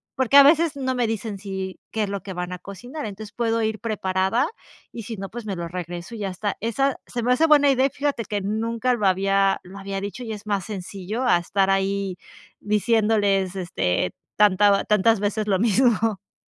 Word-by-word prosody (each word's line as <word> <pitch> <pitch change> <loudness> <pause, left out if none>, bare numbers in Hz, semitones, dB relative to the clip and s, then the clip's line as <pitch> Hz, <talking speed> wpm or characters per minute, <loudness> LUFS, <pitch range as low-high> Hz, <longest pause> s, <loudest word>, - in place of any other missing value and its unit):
porque 260 +2 +4
a 280 - +11
veces 320 +1 +4
no 260 -2 -1
me 245 -2 0
dicen, 220 -2 -4
sí, 190 -1 -5
qué 220 - -1
es 205 - -2
lo 200 -1 -4
que 190 - -7
van 180 0 -4
a 180 - -6
cocinar, 245 - -8
entonces, 205 0 -8
puedo 230 0 0
ir 220 -1 -1
preparada, 200 +3 0 0.5
y 230 - -6
si 225 0 -6
no, 195 - -5
pues, 240 -1 -8
me 200 -3 -3
lo 170 0 -4
regreso 175 +3 -6
y - - -8
ya 200 -2 -2
está, 200 +2 -3
esa 270 +5 0
se 240 - -4
me 245 +2 +3
hace 320 +6 +3
buena 290 -2 +6
idea, 265 0 +3
y - - -6
fíjate 280 -4 -2
que, 205 0 -2
nunca 230 +4 -1
lo 210 -4 -1
había 195 +1 +2
lo 185 +2 -12
había 195 0 -4
dicho, 205 +5 -6
y 225 - -5
es 210 0 -7
más 200 -2 0
sencillo 200 +3 -5
a 175 - +5
estar 195 +3 0
ahí 195 -1 0 0.4
diciéndoles, 210 -3 +2
este, 90 - -1 0.2
tanta 205 -1 +4
tantas 210 +1 +3
veces 210 +1 -1
lo 195 -2 +2
mismo, 235 +3 +4
ah. 210 -3 -3
210 Hz, 210 wpm, -23 LUFS, 195-230 Hz, 0.5 s, a